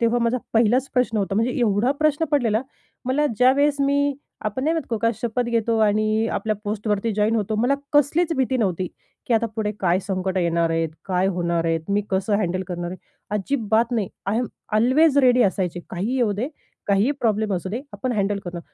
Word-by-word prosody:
तेव्हा 235 +1 +2
माझा 235 +2 +1
पहिलाच 240 +4 +3
प्रश्न 250 -3 +1
होता, 195 0 -1
म्हणजे 230 +4 +1
एवढा 220 +3 +2
प्रश्न 305 +1 +2
पडलेला 240 -5 +2 0.4
मला 285 +4 +1
ज्यावेळेस 280 +4 +4
मी, 285 0 +2 0.3
आपण 215 +6 -3
नाही 320 - +2
म्हणत 320 -5 -3
का, - - +1
को - - -5
का 230 - +3
शपथ 240 +1 -1
घेतो 230 -1 +1
आणि 215 +1 +2
आपल्या 215 -1 -1
पोस्टवरती 210 +1 -1
जॉइन 215 +2 +2
होतो, 215 0 -1
मला 245 +5 +2 0.2
कसलीच 305 +4 +3
भीती 260 0 +1
नव्हती. 185 -5 -1 0.4
की 235 - +2
आता 230 +1 +2
पुढे 210 -1 0
काय 180 -1 +2
संकटं 190 -1 -1
येणार 170 -1 +1
आहेत, 165 0 0 0.2
काय 185 0 +1
होणार 170 -1 0
आहेत, 165 -1 +1
मी 205 - +2
कसं 195 +2 0
हँडल 185 -2 -1
करणार 175 -1 -4
आहे? 185 - -7 0.4
अजिबात 225 +1 0
नाही. 215 -5 0 0.2
आय 205 +3 0
एम 245 - 0 0.3
ऑल्वेज 280 +6 +4
रेडी 250 -2 +5
असायची. 180 -3 0
काहीही 210 +9 -2
येऊ 230 -5 +2
दे, 230 +8 -2 0.4
काहीही 200 +6 +3
प्रॉब्लेम 215 -3 +1
असू 180 +1 -3
दे, 235 +5 -3
आपण 255 -1 -3
हँडल 205 -1 0
करू. 175 -1 -5
220 Hz, 195 wpm, -23 LUFS, 195-250 Hz, 0.4 s, रेडी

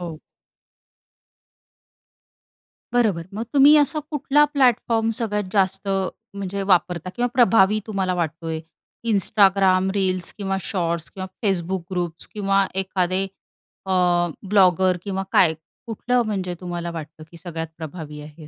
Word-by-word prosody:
हो. 170 -3 -6 2.8
बरोबर. 215 -9 +2
मग 215 +3 -3
तुम्ही 285 +2 +7
असा 300 +1 +2
कुठला 295 0 +3
प्लॅटफॉर्म 235 -4 +2
सगळ्यात 210 -3 -1
जास्त 195 0 +1 0.5
म्हणजे 200 0 -4
वापरता 180 -1 +1
किंवा 245 0 +1
प्रभावी 215 -3 +4
तुम्हाला 190 -3 -1
वाटतोय? 165 -1 -3 0.5
Instagram 195 -2 +3
रील्स 185 -3 -1
किंवा 195 -1 -2
शॉर्ट्स 170 -3 -2
किंवा 190 -1 -6 0.2
Facebook 185 -2 -1
ग्रुप्स 175 -2 -3
किंवा 195 -1 +2 0.2
एखादे 185 0 0 0.6
अ, 190 - -3 0.6
ब्लॉगर 185 -2 +4
किंवा 195 -1 -3
काय? 165 -3 +5 0.3
कुठलं 245 +2 0
म्हणजे 190 -4 -2
तुम्हाला 175 -1 -4
वाटतं, 160 -1 -8
की 170 - -12
सगळ्यात 165 -1 -6
प्रभावी 155 -2 -8
आहे? 150 +1 -12
190 Hz, 115 wpm, -22 LUFS, 170-210 Hz, 2.8 s, तुम्ही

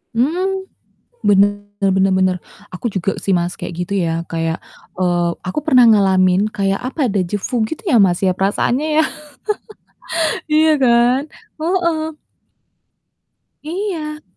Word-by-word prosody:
Mmm. 370 +9 0 0.6
Bener 205 0 +3 0.2
bener 190 0 +3
bener, 185 -1 +2 0.4
aku 185 - -8
juga 195 0 -1
sih, 195 - -1
Mas, 175 0 -1
kayak - - -6
gitu, 180 +3 -4
ya, 165 -2 0
kayak, 165 0 -2 0.3
eee, 175 -1 +1
aku 185 +11 -3
pernah 255 -6 +6
ngalamin 190 -2 +4
kayak 195 -1 0
apa 265 -2 -1
dejavu 205 +5 -1
gitu, 310 - -6
ya, 255 - +5
Mas, 185 -4 +3
ya, 190 - +3
perasaannya 240 +9 0
ya. - - +2 1.4
Iya 310 +1 +4
kan? 245 0 +4 0.4
Heeh. 325 -2 0 1.5
Iya. 315 -3 -4
205 Hz, 120 wpm, -18 LUFS, 185-305 Hz, 1.5 s, pernah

